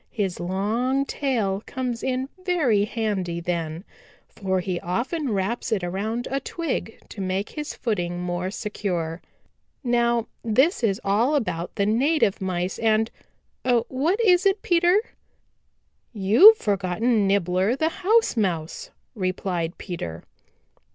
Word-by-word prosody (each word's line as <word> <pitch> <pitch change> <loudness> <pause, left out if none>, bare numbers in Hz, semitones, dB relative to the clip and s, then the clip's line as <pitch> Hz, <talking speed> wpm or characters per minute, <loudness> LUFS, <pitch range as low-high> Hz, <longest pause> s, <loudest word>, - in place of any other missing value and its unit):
His 195 -6 -2
long 225 +9 0
tail 225 -10 -1
comes 250 -3 -3
in 260 0 -1 0.2
very 280 - +2
handy 205 -6 -2
then, 170 -1 -3 0.4
for 190 -2 -2
he 180 -1 -2
often 250 - -2
wraps 210 +4 -2
it 205 -5 0
around 215 +7 -2
a 275 - 0
twig 280 -5 -4
to 200 - -7
make 190 +2 -2
his 300 -1 -6
footing 175 -6 -2
more 180 +1 -2
secure. 180 -6 -3 0.6
"Now 235 -2 +2 0.2
this 255 - +2
is 200 -3 +1
all 225 +9 +2
about 180 - -2
the 200 - +1
native 235 0 +2
Mice 180 -1 -2
and 220 0 +2 0.5
what 260 - +1
is 380 -3 +5
it, 390 +1 +1
Peter?" 350 +3 +4 1.1
"You've 230 - +7
forgotten 205 - +1
Nibbler 195 +3 +2
the 315 +3 +1
House 445 - +3
Mouse," 185 - -2 0.2
replied 185 -4 -2
Peter. 85 - -6
215 Hz, 125 wpm, -24 LUFS, 185-260 Hz, 1.1 s, You've